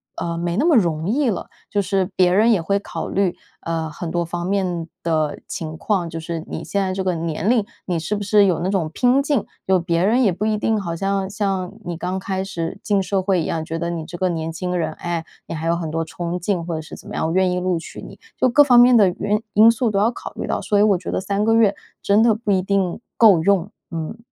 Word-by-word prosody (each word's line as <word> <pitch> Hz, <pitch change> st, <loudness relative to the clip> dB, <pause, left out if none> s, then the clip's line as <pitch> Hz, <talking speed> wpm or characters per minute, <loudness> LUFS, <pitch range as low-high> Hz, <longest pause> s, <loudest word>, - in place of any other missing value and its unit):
呃， 170 Hz, 0 st, -3 dB
没 170 Hz, 0 st, -2 dB
那 225 Hz, -, +1 dB
么 330 Hz, -6 st, +5 dB
容 165 Hz, -4 st, +1 dB
易 265 Hz, +3 st, +2 dB
了。 200 Hz, -, -3 dB, 0.2 s
就 205 Hz, -, +1 dB
是 190 Hz, -1 st, 0 dB
别 180 Hz, -1 st, +4 dB
人 215 Hz, +5 st, +4 dB
也 185 Hz, -, +1 dB
会 200 Hz, +4 st, 0 dB
考 -, -, -6 dB
虑， 190 Hz, -3 st, 0 dB, 0.2 s
呃 165 Hz, -1 st, -3 dB
很 165 Hz, +3 st, -6 dB
多 170 Hz, +1 st, 0 dB
方 175 Hz, +1 st, -4 dB
面 180 Hz, -4 st, -1 dB, 0.2 s
的 155 Hz, -3 st, 0 dB
情 160 Hz, -5 st, -5 dB
况， 175 Hz, 0 st, -1 dB
就 165 Hz, 0 st, -6 dB
是 165 Hz, 0 st, -5 dB
你 -, -, -5 dB
现 200 Hz, -, -1 dB
在 190 Hz, -1 st, -1 dB
这 190 Hz, 0 st, -2 dB
个 185 Hz, -2 st, 0 dB
年 165 Hz, +4 st, -2 dB
龄， 235 Hz, -4 st, +3 dB, 0.2 s
你 175 Hz, -3 st, -1 dB
是 170 Hz, +6 st, -2 dB
不 205 Hz, -, -3 dB
是 205 Hz, 0 st, +4 dB
有 180 Hz, -4 st, +1 dB
那 180 Hz, +3 st, -1 dB
种 185 Hz, -5 st, 0 dB
拼 250 Hz, +2 st, +3 dB
劲。 280 Hz, -7 st, 0 dB, 0.2 s
有 190 Hz, 0 st, +3 dB
别 170 Hz, 0 st, 0 dB
人 240 Hz, +5 st, +3 dB
也 200 Hz, -, +4 dB
不 190 Hz, +5 st, -3 dB
一 215 Hz, -1 st, +1 dB
定 220 Hz, 0 st, 0 dB
好 170 Hz, -4 st, -4 dB
像， 195 Hz, +1 st, -1 dB
像， 195 Hz, -2 st, -2 dB
你 175 Hz, -2 st, -5 dB
刚 180 Hz, +2 st, -3 dB
开 190 Hz, 0 st, -3 dB
始 175 Hz, 0 st, -4 dB
进 200 Hz, -2 st, +1 dB
社 195 Hz, 0 st, 0 dB
会 185 Hz, -2 st, +1 dB
一 -, -, -3 dB
样， 160 Hz, -1 st, -2 dB
觉 165 Hz, +1 st, -4 dB
得 170 Hz, +1 st, -2 dB
你 165 Hz, -2 st, -4 dB
这 175 Hz, -, -8 dB
个 185 Hz, +1 st, +1 dB
年 165 Hz, -1 st, -3 dB
轻 180 Hz, +2 st, -3 dB
人， 160 Hz, -2 st, -1 dB
诶， 170 Hz, -1 st, -4 dB, 0.2 s
你 -, -, -5 dB
还 160 Hz, 0 st, -4 dB
有 170 Hz, -, +2 dB
很 165 Hz, -2 st, -4 dB
多 165 Hz, +1 st, -1 dB
冲 170 Hz, +2 st, -4 dB
劲 175 Hz, -1 st, -1 dB
或 170 Hz, -1 st, -3 dB
者 160 Hz, -, -3 dB
是 155 Hz, -, -10 dB
怎 -, -, -13 dB
么 -, -, -8 dB
样， -, -, 0 dB
我 165 Hz, -, -2 dB
愿 185 Hz, 0 st, +3 dB
意 180 Hz, -, 0 dB
录 180 Hz, -1 st, 0 dB
取 165 Hz, -, -9 dB
你。 -, -, -11 dB, 0.2 s
就 -, -, +4 dB
各 290 Hz, +5 st, +6 dB
方 250 Hz, -4 st, +6 dB
面 245 Hz, +1 st, +7 dB
的 205 Hz, -5 st, +6 dB
原 210 Hz, +1 st, 0 dB
因 215 Hz, +3 st, +7 dB
素 230 Hz, 0 st, +1 dB
都 200 Hz, -, +1 dB
要 215 Hz, -, +3 dB
考 240 Hz, -, -7 dB
虑 -, -, -4 dB
到， -, -, -1 dB
所 205 Hz, -, +1 dB
以 -, -, +5 dB
我 205 Hz, -3 st, +4 dB
觉 180 Hz, -, -6 dB
得 -, -, 0 dB
3 200 Hz, +2 st, -1 dB
个 225 Hz, +1 st, +3 dB
月， 220 Hz, -3 st, +4 dB, 0.3 s
真 205 Hz, +3 st, +3 dB
的 235 Hz, -, +5 dB
不 215 Hz, -1 st, -2 dB
一 185 Hz, -, +2 dB
定， 195 Hz, 0 st, -1 dB, 0.2 s
够 200 Hz, -8 st, +6 dB
用， 195 Hz, 0 st, +2 dB, 0.2 s
嗯。 165 Hz, +5 st, -5 dB
185 Hz, 285 characters per minute, -21 LUFS, 170-205 Hz, 0.3 s, 面